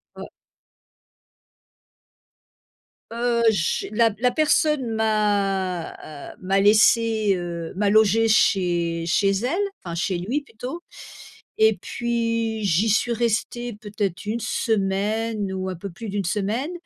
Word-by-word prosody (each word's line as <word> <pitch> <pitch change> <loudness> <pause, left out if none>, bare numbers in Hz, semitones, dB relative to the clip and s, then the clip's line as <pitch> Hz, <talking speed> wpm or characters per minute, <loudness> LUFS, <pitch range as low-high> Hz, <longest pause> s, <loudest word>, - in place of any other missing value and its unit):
Ouais. - - -8 2.9
Heu, 235 0 0
j'ai, 170 -6 -1
la 230 +1 +3
p 210 +1 -16
la 250 0 +3
personne 300 0 +2
m'a, 200 -5 0 0.4
heu, - - -16
m'a 195 +1 +1
laissée, 215 0 +4
heu, 170 -2 -5
m'a 205 +1 +1
logée 220 +1 +4
chez 175 -5 +2
chez 195 +3 +2
elle, 245 - -1 0.2
enfin 170 -2 -5
chez 180 +2 -1
lui 230 +12 -2
plutôt. 265 +4 -8 0.8
Et 220 -1 +4
puis 230 -2 -2
j'y 200 +3 +2
suis 230 +3 +2
restée 235 +1 -2
peut-être 205 -3 -4
1 220 +3 -2
semaine 210 -1 -1
ou 190 0 -3
un 185 - -4
peu 195 +4 -7
plus 215 +6 -8
d'1 200 0 -2
semaine 215 - -1
215 Hz, 125 wpm, -23 LUFS, 195-230 Hz, 2.9 s, laissée